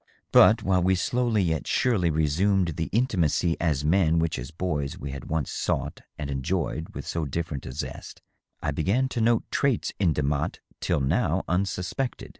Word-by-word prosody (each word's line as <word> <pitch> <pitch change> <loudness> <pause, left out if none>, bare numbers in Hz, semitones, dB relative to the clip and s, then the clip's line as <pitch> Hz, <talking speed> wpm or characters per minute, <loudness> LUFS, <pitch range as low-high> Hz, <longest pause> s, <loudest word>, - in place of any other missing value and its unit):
But - - +6
while 95 -1 +2
we 95 +2 +3
slowly 115 +2 +1
yet 80 -3 -1
surely 100 -9 +2
resumed 85 +5 +2
the 80 -1 -3
intimacy 90 - +1
as 75 -4 0
men 85 0 +3
which 80 -3 0
as 65 +2 -6
boys 80 -5 -3
we 70 +1 -6
had 70 - -7
once 80 -3 -2
sought - - -2 0.2
and 75 - -4
enjoyed 80 +3 -2
with - - -6
so 85 - -2
different 75 0 -4
a - - -5
zest, - - -7 0.4
I 75 - 0
began 100 - +1
to 120 - -2
note 115 0 +3
traits 140 -5 +1
in 90 -5 +3
Demotte 70 -1 -1 0.2
till - - 0
now 65 - +1
unsuspected. 95 +7 -2
85 Hz, 170 wpm, -26 LUFS, 75-95 Hz, 0.4 s, But